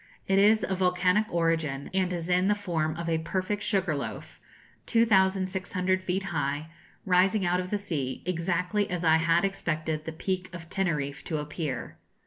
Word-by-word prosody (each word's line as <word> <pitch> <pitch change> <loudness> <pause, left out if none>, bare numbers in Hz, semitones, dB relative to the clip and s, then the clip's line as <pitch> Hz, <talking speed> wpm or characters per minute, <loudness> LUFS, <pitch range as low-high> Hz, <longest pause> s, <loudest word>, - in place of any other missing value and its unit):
It 195 0 +3
is 215 +2 +5
of 190 -1 -2
volcanic 180 +3 +2
origin, 165 -5 0
and 185 -1 +1
is 170 -2 -3
in 180 +1 +3
the 210 - +3
form 165 -6 -1
of 170 0 -5
a 165 -1 +1
perfect 185 +5 -2
sugar 190 -6 +1
loaf, 140 - -6 0.5
2,600 190 -4 +2
feet 185 +1 -1
high, 150 -3 -2 0.3
rising 190 +2 +3
out 175 +1 +2
of 180 0 -4
the 210 - 0
sea, 145 -10 -4
exactly 180 +3 0
as 180 -1 -2
I 160 -1 +5
had 165 +3 +3
expected 155 -5 -2
the 160 - -4
Peak 185 +3 -3
of 165 -1 -9
Teneriffe 150 -7 -1
to 155 - -2
appear. 150 -3 -4
180 Hz, 165 wpm, -28 LUFS, 160-190 Hz, 0.5 s, is